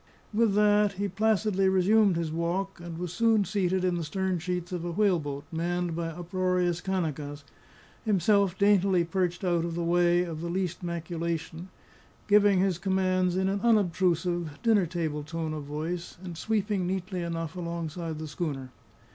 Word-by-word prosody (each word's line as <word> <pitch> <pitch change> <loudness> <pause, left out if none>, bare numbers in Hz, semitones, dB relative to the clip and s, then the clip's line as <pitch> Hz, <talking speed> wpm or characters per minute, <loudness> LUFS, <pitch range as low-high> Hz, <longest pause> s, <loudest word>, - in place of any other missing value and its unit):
With 215 -2 +3
that 210 -1 +4
he 200 +1 -2
placidly 205 -1 +2
resumed 195 +1 +4
his 165 -2 -2
walk, 175 +4 -2
and 170 -1 -7
was 175 0 -4
soon 225 0 +3
seated 185 -1 0
in 180 - +2
the 170 - -2
stern 185 +3 -1
sheets 180 +1 -3
of 175 -2 -3
a 175 - -3
whaleboat 165 -8 0
manned 175 +1 -1
by 170 0 -2
uproarious 180 +1 -1
Kanakas, 155 -6 -3 0.6
himself 200 -2 +2
daintily 200 -3 +4
perched 175 +1 -1
out 175 -2 +1
of 170 -1 -3
the 170 - -1
way 175 +1 +3
of 165 -3 -5
the 170 - -3
least 185 0 -2
maculation, 170 0 -4 0.6
giving 205 -1 +5
his 185 -2 +1
commands 185 -1 +1
in 190 0 +1
an 195 +1 -1
unobtrusive, 175 -7 +1
dinner 215 -6 +4
table 160 -3 -2
tone 160 +1 -4
of 150 -2 -5
voice, 160 +5 -4
and 175 -2 -6
sweeping 205 0 -1
neatly 185 0 -3
enough 165 -1 -4
alongside 170 -2 -4
the 155 0 -5
schooner. 145 -4 -4
175 Hz, 160 wpm, -28 LUFS, 165-190 Hz, 0.6 s, giving